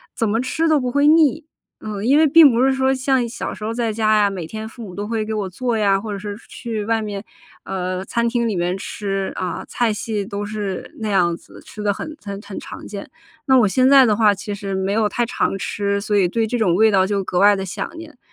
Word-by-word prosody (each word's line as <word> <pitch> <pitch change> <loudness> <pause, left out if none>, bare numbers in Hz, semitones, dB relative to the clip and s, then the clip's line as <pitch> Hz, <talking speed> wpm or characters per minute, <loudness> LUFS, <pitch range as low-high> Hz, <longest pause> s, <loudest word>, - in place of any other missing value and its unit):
怎 225 - 0
么 225 +3 +1
吃 320 +6 0
都 310 -2 +4
不 250 -2 -2
会 285 +3 +2
腻。 315 0 +4 0.4
嗯， 210 -2 -5
因 275 +3 +5
为 315 - +5
并 310 0 +8
不 235 +2 +2
是 270 0 +3
说 265 0 +2
像 260 -2 +1
小 235 - -5
时 - - -13
候 220 - -2
在 230 -1 -1
家 215 0 +2
呀， 205 -1 +3
每 185 -5 -6
天 220 +4 -6
父 230 +2 -12
母 190 -5 -8
都 205 - -4
会 220 0 -2
给 220 - -4
我 210 -3 -2
做 235 +5 -2
呀， 200 -2 +2
或 215 +1 -6
者 200 - -3
是 205 +1 -6
去 225 -4 -5
外 225 0 +1
面， 205 -2 -5 0.4
呃， 185 0 -3
餐 235 +2 0
厅 235 0 0
里 215 - -1
面 175 +1 0
吃， 195 -1 -3
啊， 185 - -4
菜 235 -2 0
系 210 -1 -3
都 200 +1 -5
是 205 -3 -5
那 215 - -2
样 175 -4 +2
子， - - -15
吃 210 - -9
得 205 -1 +2
很 310 +9 -7
很 200 -1 -6
很 200 -1 -9
常 - - -9
见。 200 -1 -7 0.4
那 265 -2 +5
我 220 - +4
现 255 +6 +3
在 270 -1 +7
的 215 -3 +3
话， 210 -1 +4
其 200 +1 -6
实 195 0 -5
没 190 +1 -1
有 215 0 +2
太 240 +3 0
常 230 - -1
吃， 200 +1 -1
所 205 +1 -2
以 195 -3 +4
对 225 +3 0
这 245 - -1
种 210 -7 +2
味 220 +5 +5
道 190 -3 +3
就 200 0 -1
格 180 - -3
外 205 +1 +6
地 195 - -3
想 195 - -5
念。 315 -4 -11
215 Hz, 275 characters per minute, -20 LUFS, 200-240 Hz, 0.4 s, 并